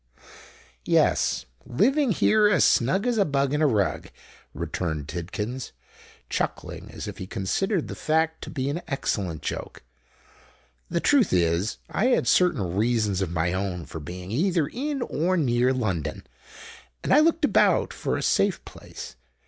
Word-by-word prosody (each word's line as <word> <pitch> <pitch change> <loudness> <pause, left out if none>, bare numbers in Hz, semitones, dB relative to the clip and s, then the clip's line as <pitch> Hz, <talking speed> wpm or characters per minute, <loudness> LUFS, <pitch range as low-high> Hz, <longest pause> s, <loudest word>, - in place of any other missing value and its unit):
"Yes—living 210 - +1
here 215 +3 +4
as 180 -8 +4
snug 185 - +2
as 240 -3 +1
a - - +6
bug 140 -4 0
in 150 - +1
a 155 - +5
rug," 105 -7 0 0.4
returned 80 -5 -3
Tidkins, 105 +10 -5 0.5
chuckling - - -4
as - - -7
if - - -7
he 95 - -6
considered 150 - -1
the - - -6
fact 160 +1 0
to - - -7
be 135 -3 -3
an 170 +4 -3
excellent 95 - -2
joke. - - -5 1.1
"The 170 - -1
truth 275 -9 +3
is 85 +4 +1
I 225 - 0
had 255 - +2
certain 100 - +2
reasons 110 -3 +1
of 95 - -1
my 85 +1 0
own 95 -3 -3
for 80 - -7
being 90 +5 -8
either 170 - +1
in 275 - -3
or 180 +1 0
near 125 -4 +2
London: 95 - -2 0.8
and - - +2
I 290 - +7
looked 325 0 +3
about - - +3
for - - -2
a - - -3
safe 195 -2 +1
place. 60 - -10
130 Hz, 150 wpm, -25 LUFS, -, 1.1 s, I